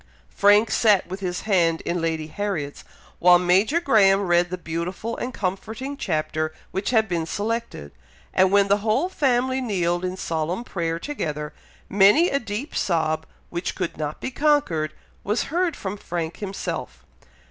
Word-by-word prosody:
Frank 205 +2 +5
sat 210 -4 +3
with 190 +2 -6
his 180 -2 -3
hand 170 -6 +2
in 175 0 -2
Lady 160 -1 -1
Harriet's, 160 -4 -4 0.4
while 180 0 +7
Major 190 - +3
Graham 205 - +4
read 175 -2 +2
the 185 - -4
beautiful 175 +7 -4
and 250 - -3
comforting 220 +7 -4
chapter 155 - -2 0.2
which 190 +2 -2
had 220 -3 +3
been 170 -4 -2
selected, 220 - -3 0.4
and 185 0 +4
when 200 0 +4
the 200 +1 +4
whole 220 - 0
family 260 -5 +1
kneeled 175 -7 0
in 185 0 -3
solemn 165 +5 -2
prayer 165 -7 -2
together, 150 - -4 0.3
many 205 - +5
a 280 - +1
deep 220 +5 -5
sob, 160 -3 0 0.2
which 175 +1 -3
could 185 -3 -3
not 150 -1 -4
be - - -4
conquered, 255 - +1 0.3
was 210 +4 0
heard 350 -2 +1
from 195 +1 -5
Frank 170 -4 -4
himself. 195 -2 -5
190 Hz, 155 wpm, -23 LUFS, 170-225 Hz, 0.4 s, while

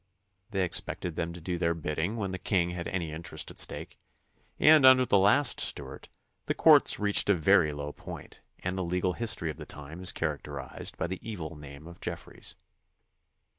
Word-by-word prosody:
They 95 -3 -1
expected 85 0 -1
them 85 +1 -3
to 85 - -8
do 85 +1 -4
their 85 -1 0
bidding 80 +5 -3
when 100 -4 -3
the 95 - -5
king 90 -3 0
had 85 -1 -5
any 85 -4 -3
interest 80 +2 -4
at - - -11
stake, - - 0 0.6
and 155 -2 +6
under 130 -1 +7
the 100 - +3
last 120 +7 +4
Stuart - - 0 0.4
the - - -1
courts - - +5
reached 105 0 +4
a 100 - +5
very 85 -1 +3
low 75 0 -6
point - - -11 0.2
and 90 +1 -3
the 95 - -2
legal 90 +1 -1
history 110 -8 0
of 75 - -12
the 75 - -8
time 75 +4 -9
is 95 - +3
characterized 70 -4 -5
by - - -2
the 95 +2 -5
evil 85 -7 -7
name 70 0 -12
of 85 +1 -13
Jef - - -5
freys. - - -6
85 Hz, 190 wpm, -28 LUFS, 80-95 Hz, 0.6 s, under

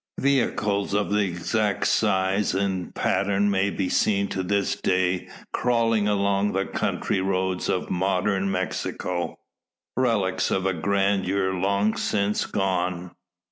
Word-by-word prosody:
Vehicles 105 -7 +1
of 105 0 0
the 105 - +2
exact 100 +3 -1
size, 95 -1 +1
and 95 -2 -2
pattern, 100 +1 +1
may 100 0 +2
be 95 -1 -2
seen 100 +1 +2
to 95 - -2
this 100 +2 0
day 90 -1 0 0.2
crawling 115 -3 +2
along 100 0 +1
the 95 +1 0
country 95 - -1
roads 95 -1 -1
of 90 - -1
modern 95 +1 0
Mexico 90 -1 -3 0.6
relics 100 -7 +1
of 95 - 0
a 95 - +2
grandeur 95 +1 +1
long 100 +3 +1
since 100 0 0
gone. 90 -2 -1
100 Hz, 125 wpm, -25 LUFS, 95-100 Hz, 0.6 s, the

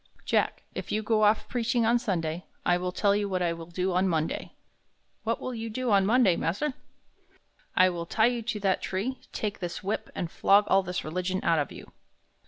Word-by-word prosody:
"Jack, - - +1
if - - -5
you 215 +1 0
go 215 0 +2
off 210 +1 +3
preaching 235 -1 0
on 235 +2 +4
Sunday, 175 -7 -2 0.2
I 175 - +4
will 180 +1 -2
tell 200 +2 +2
you 205 -1 -1
what 185 -1 0
I 170 -1 +1
will 165 -1 -8
do 180 +2 -1
on 185 +2 +2
Monday." 160 -2 -2 0.7
"What 230 +1 -1
will 255 - -4
do 230 -2 -5 0.2
you 255 -3 0
on 195 -1 +4
Monday, 225 -6 +4
mas'r?" 260 - -1 1.0
"I 185 - +6
will 170 -2 -4
tie 220 +4 +3
you 240 0 +1
to 220 -1 -3
that 190 -2 +1
tree, 225 +8 -3
take 210 -2 -3
this 175 +2 -5
whip, 200 +3 -2
and 170 -2 -3
flog 200 +1 +5
all 195 - +5
this 180 -1 -4
religion 180 +4 -2
out 165 -2 +3
of 145 - -2
you." - - -11
195 Hz, 205 wpm, -28 LUFS, 175-225 Hz, 1.0 s, I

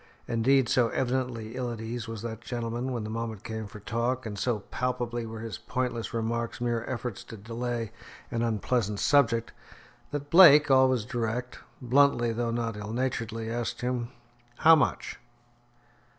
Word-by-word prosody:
Indeed, 125 +3 +3
so 120 -1 +3
evidently 125 -3 -2
ill 125 -1 -2
at 115 - -6
ease 115 0 -5
was 115 -1 -6
that 115 -1 -5
gentleman, 120 +1 -3
when 120 -3 -3
the 105 - -5
moment 110 -2 -4
came 110 -2 -5
for 105 - -11
talk, 120 +4 -2
and 105 -2 -4
so 110 0 -1
palpably 120 -2 -2
were 110 0 -7
his 115 -1 -6
pointless 120 -4 -3
remarks 115 0 -2
mere 120 -1 -1
efforts 120 -4 -4
to 115 - -9
delay 115 +1 -4 0.4
an 115 - -1
unpleasant 110 -2 0
subject, 115 -5 +3 0.6
that 145 0 -5
Blake, 150 -5 +8
always 130 -4 +4
direct 120 +2 -3 0.2
bluntly 125 -2 +3
though 120 +1 -1
not 115 -1 -2
ill 105 +1 -6
naturedly 115 -3 -2
asked 120 0 -3
him, 125 -1 -2 0.5
"How 165 +1 +7
much?" 150 - -1
120 Hz, 155 wpm, -28 LUFS, 115-125 Hz, 0.6 s, Blake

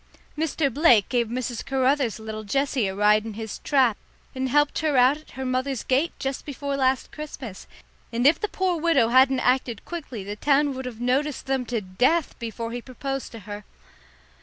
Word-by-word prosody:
Mr. 300 -3 0
Blake 250 -8 +5
gave 240 -2 +1
Mrs. 240 0 -3
Caruther's 265 -2 +1
little 220 0 -6
Jessie 270 0 0
a 190 - -4
ride 210 +1 +4
in 220 -2 -7
his 220 -1 -6
trap 255 -7 +2 0.4
and 260 0 -2
helped 295 +2 +2
her 305 -4 +1
out 255 +3 +6
at 310 - -17
her 265 - -3
mother's 255 0 -1
gate 275 +6 +1
just 270 0 -3
before 280 0 -4
last 260 -1 +1
Christmas, 270 -9 -8 0.4
and 240 +2 -1
if 300 +4 +6
the 425 - 0
poor 370 -4 -1
widow 280 -9 +3
hadn't 260 +1 +5
acted 250 -3 0
quickly 280 - -6
the 205 +2 -5
town 285 +4 +2
would 260 0 -6
have 240 -3 -7
noticed 270 +4 0
them 265 -2 -1
to 235 -2 -1
death 250 - +1
before 230 0 -5
he 245 +1 -4
proposed 270 +2 -5
to 230 - -9
her. 205 +2 -8
260 Hz, 185 wpm, -25 LUFS, 230-280 Hz, 0.4 s, out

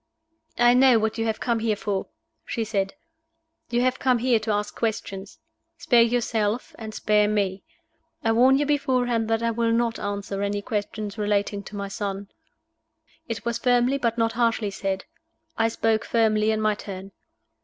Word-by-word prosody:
"I 240 0 +5
know 255 -1 +6
what 220 +1 -1
you 225 - 0
have 220 -1 -1
come 235 -2 0
here 220 -1 0
for," 200 -1 -3 0.4
she 230 - -3
said. 200 -1 -2 0.7
"You 240 0 +1
have 255 +1 +1
come 255 -2 +3
here 240 -1 +2
to 220 +1 -6
ask 205 0 -2
questions. 205 -3 -4 0.4
Spare 240 -2 +4
yourself, 230 -1 0
and 220 -1 -6
spare 210 -1 +2
me. 200 -2 0 0.6
I 225 - +2
warn 255 +4 +5
you 290 - +1
beforehand 250 -5 +1
that 225 +1 0
I 230 - +1
will 230 0 0
not 230 0 +1
answer 200 -1 -4
any 205 0 -1
questions 210 -1 -4
relating 205 -1 0
to 210 - -9
my 200 0 -3
son." 200 -1 -4 1.0
It 225 -2 -5
was 235 0 -1
firmly, 245 +2 +2
but 235 -2 0
not 225 -1 +2
harshly 230 -3 0
said. 195 -1 -3 0.5
I 225 - +2
spoke 225 -1 0
firmly 215 -2 +2
in 220 0 +1
my 215 0 +2
turn. 195 -2 -8
220 Hz, 170 wpm, -25 LUFS, 205-235 Hz, 1.0 s, know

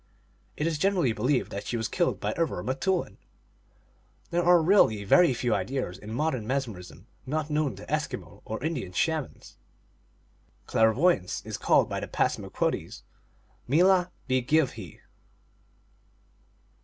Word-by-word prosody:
It 150 - -1
is 160 -3 -1
generally 180 - +2
believed 125 +5 0
that 100 - -6
she 120 - -2
was 110 -1 -2
killed 175 - 0
by - - -2
other 165 -1 -1
m - - -9
teoulin. 135 - -1 1.1
There 170 +1 +1
are 175 0 +6
really 160 - +4
very 170 - +5
few 120 -1 0
ideas 100 0 -2
in 105 - -9
modern 130 -3 -1
mesmer 130 -7 -2
ism 90 - -13 0.2
not 155 +2 -2
known 150 -3 0
to - - -11
Eskimo - - -4
or 110 - -6
Indian 150 - -3
Shamans. 160 - -2 1.1
Clair 110 0 +3
voyance 130 - +1
is - - -5
called - - +3
by - - -3
the - - -5
Passamaquoddies - - -2 0.7
Meelah 180 +4 +4 0.2
bi 130 0 +2
give 145 +2 +2
he. 95 -8 -11
135 Hz, 145 wpm, -27 LUFS, 110-165 Hz, 1.1 s, are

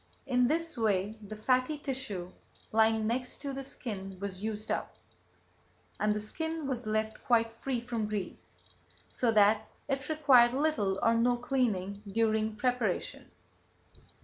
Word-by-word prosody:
In 250 -2 +3
this 325 -1 -1
way 210 0 +1
the 215 +1 -8
fatty 255 +6 +1
tissue 215 -11 -4 0.4
lying 220 0 +3
next 245 +3 -1
to 280 -1 -3
the 270 0 -4
skin 195 -7 -6
was 200 -1 -5
used 215 0 -3
up, - - -2 1.0
and 210 0 +2
the - - -1
skin 320 +8 -4
was 255 -4 -3
left 215 0 -1
quite 230 -2 +3
free 265 -3 -1
from 230 -2 -3
grease, 205 -4 -5 0.5
so 240 -2 +1
that 215 0 +4 0.2
it 270 0 -2
required 260 -6 +5
little 225 -10 +1
or 230 - +5
no 240 +1 +3
cleaning 215 -6 -1
during 220 0 +1
preparation. 245 -4 -1
230 Hz, 140 wpm, -31 LUFS, 210-255 Hz, 1.0 s, required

